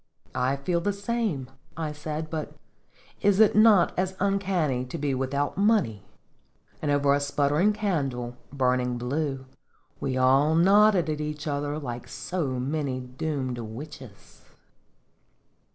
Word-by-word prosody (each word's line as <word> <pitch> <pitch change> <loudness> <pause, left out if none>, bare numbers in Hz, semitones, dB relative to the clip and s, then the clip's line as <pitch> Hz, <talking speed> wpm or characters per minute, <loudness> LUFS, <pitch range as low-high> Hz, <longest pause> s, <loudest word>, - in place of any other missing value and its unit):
"I 130 +2 +1
feel 170 +5 -1
the 205 +3 0
same," 200 - -2 0.3
I 160 -2 -2
said; 155 +1 -5
"but 155 -2 -4 0.7
is 200 0 +3
it 220 -2 +6
not 215 -4 +6
as 185 +1 -1
uncanny 185 -9 0
to 130 +6 -6
be 145 -2 -1
without 140 +6 -1
money?" 200 - +2 0.8
And 150 - -1
over 145 -1 +3
a 140 - +2
sputtering 145 +6 +2
candle, 140 - -2 0.2
burning 125 -2 +1
blue, 135 +2 -2 0.5
we 130 -1 -2
all 135 +4 +4
nodded 195 +1 +5
at 155 -1 -2
each 150 0 -4
other 145 0 -2
like 120 -5 -6
so 150 +5 -3
many 135 0 -2
doomed 130 0 -4
witches. 120 0 -10
145 Hz, 130 wpm, -26 LUFS, 130-180 Hz, 0.8 s, it